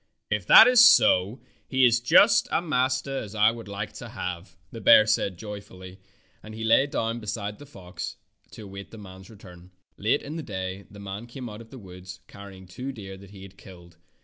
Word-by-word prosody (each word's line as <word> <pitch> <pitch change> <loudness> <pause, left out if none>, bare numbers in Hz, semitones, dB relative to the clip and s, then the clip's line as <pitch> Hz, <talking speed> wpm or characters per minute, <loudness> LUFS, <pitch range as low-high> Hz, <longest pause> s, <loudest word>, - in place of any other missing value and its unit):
''If 105 -4 -2
that - - +9
is 250 -1 +6
so 115 - +4 0.3
he 130 -1 +2
is 120 -1 +3
just 115 -1 +4
such - - -18
a - - +2
master 135 -3 -2
as 105 0 -9
I 105 +1 +4
would 115 -2 -10
like 100 +1 -6
to 120 - -10
have," 90 -6 -7
the 115 - -9
bear 110 - +6
said 105 -4 -1
joyfully, 95 -2 -11 0.4
and 110 0 -11
he 110 - -7
lay 115 +5 +3
down 115 -4 -3
beside 105 -1 -6
the 145 - -13
fox 90 -8 -9 0.3
to 110 - -12
await 100 -1 -10
the 115 - -13
man's 95 -2 -13
return. 90 -4 -15 0.3
Late 110 +8 0
in 150 +3 -7
the - - -5
day 95 -5 -7
the 105 - -14
man 100 +3 -8
came 125 +1 -9
out 105 0 -10
of 115 - -15
the 130 - -12
woods 90 -3 -12
carrying 100 -2 -13
two 125 +9 -7
deer 100 -6 -10
that 95 0 -15
he 95 -1 -13
had 95 0 -15
killed. 85 -3 -16
105 Hz, 210 wpm, -25 LUFS, 95-120 Hz, 0.4 s, that